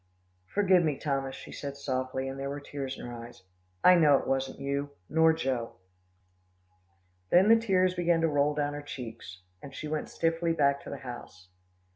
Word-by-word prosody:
"Forgive 185 Hz, -, +3 dB
me, 150 Hz, -4 st, 0 dB
Thomas," 135 Hz, -2 st, -2 dB
she -, -, -10 dB
said 140 Hz, -1 st, -6 dB
softly, 130 Hz, -1 st, -2 dB
and 135 Hz, +1 st, -6 dB
there 140 Hz, 0 st, -3 dB
were 145 Hz, +1 st, -4 dB
tears 140 Hz, -2 st, -6 dB
in -, -, -8 dB
her 120 Hz, -, -7 dB
eyes. 115 Hz, -4 st, -10 dB, 0.4 s
"I 180 Hz, -, +8 dB
know 155 Hz, -5 st, +6 dB
it -, -, -4 dB
wasn't 135 Hz, 0 st, -1 dB
you, 140 Hz, +1 st, -2 dB, 0.2 s
nor 160 Hz, +1 st, +4 dB
Joe." 130 Hz, -7 st, -2 dB, 1.5 s
Then 185 Hz, +4 st, +5 dB
the 225 Hz, -, +9 dB
tears 185 Hz, -5 st, +2 dB
began 175 Hz, -2 st, +1 dB
to 165 Hz, -, +3 dB
roll 145 Hz, -1 st, +1 dB
down 145 Hz, -1 st, -1 dB
her 145 Hz, -, -5 dB
cheeks, 115 Hz, -9 st, -9 dB, 0.2 s
and 135 Hz, -1 st, -10 dB
she 155 Hz, -, -5 dB
went 155 Hz, 0 st, -3 dB
swiftly 165 Hz, 0 st, 0 dB
back 140 Hz, -3 st, +2 dB
to -, -, -7 dB
the 140 Hz, -, -5 dB
house. 95 Hz, -7 st, -9 dB
140 Hz, 185 wpm, -29 LUFS, 135-165 Hz, 1.5 s, the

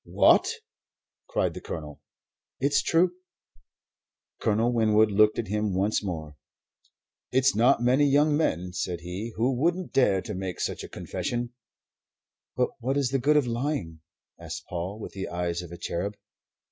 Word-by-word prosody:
"What?" -, -, +4 dB, 0.8 s
cried -, -, 0 dB
the -, -, -8 dB
Colonel. 75 Hz, -2 st, -7 dB, 0.6 s
"It's 140 Hz, +1 st, +2 dB
true." 170 Hz, +2 st, +3 dB, 1.3 s
Colonel 115 Hz, +3 st, +2 dB
Winwood 110 Hz, -2 st, +4 dB
looked 105 Hz, +1 st, +4 dB
at 115 Hz, -5 st, -3 dB
him 105 Hz, -2 st, -1 dB
once 100 Hz, +3 st, +1 dB
more. 80 Hz, -6 st, -5 dB, 0.9 s
"It's 130 Hz, +1 st, +3 dB
not 120 Hz, +2 st, +4 dB
many 130 Hz, +4 st, +4 dB
young 145 Hz, +2 st, +4 dB
men," 90 Hz, -, 0 dB
said 90 Hz, -1 st, -3 dB
he, 90 Hz, +7 st, -5 dB
"who 125 Hz, +4 st, +1 dB
would 175 Hz, +6 st, 0 dB
dare 100 Hz, -8 st, +3 dB
to 105 Hz, -, -5 dB
make 95 Hz, -1 st, -4 dB
such -, -, -2 dB
a -, -, -8 dB
confession." 120 Hz, 0 st, -4 dB, 1.0 s
"But 125 Hz, -, +2 dB
what 130 Hz, +4 st, -1 dB
is 140 Hz, -3 st, +1 dB
the 135 Hz, -, 0 dB
good 150 Hz, +4 st, +3 dB
of 145 Hz, -, +3 dB
lying?" 120 Hz, -, -2 dB, 0.4 s
asked -, -, -7 dB
Paul, 90 Hz, +4 st, -4 dB
with -, -, -7 dB
the 95 Hz, -1 st, -5 dB
eyes 85 Hz, 0 st, -2 dB
of 85 Hz, -1 st, -10 dB
a 85 Hz, -, -7 dB
cherub. 100 Hz, +6 st, -3 dB
110 Hz, 155 wpm, -27 LUFS, 90-135 Hz, 1.3 s, What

